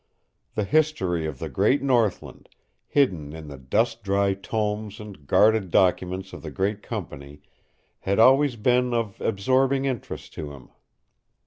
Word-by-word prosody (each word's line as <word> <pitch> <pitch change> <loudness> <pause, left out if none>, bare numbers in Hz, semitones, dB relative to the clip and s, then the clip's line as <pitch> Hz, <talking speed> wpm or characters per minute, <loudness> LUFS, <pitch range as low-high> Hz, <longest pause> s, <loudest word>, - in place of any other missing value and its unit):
The 105 - 0
history 100 - +1
of 75 -4 -6
the - - -5
great 130 +9 +1
northland, 120 -7 0 0.4
hidden 90 - +1
in 80 -2 -9
the 70 - -9
dust 115 - 0
dry 100 -1 +1
tomes 105 +1 -3
and 100 -10 -11
guarded 105 0 +4
documents 95 +1 +1
of - - -8
the - - -7
great 100 +2 -2
company, 75 - -8 0.6
had 100 +1 -1
always 135 +3 +5
been 125 +2 +1
of 110 -4 -3
absorbing 130 +6 +1
interest 130 -5 -5
to 75 -2 -7
him. 65 -3 -14
105 Hz, 140 wpm, -25 LUFS, 90-120 Hz, 0.6 s, always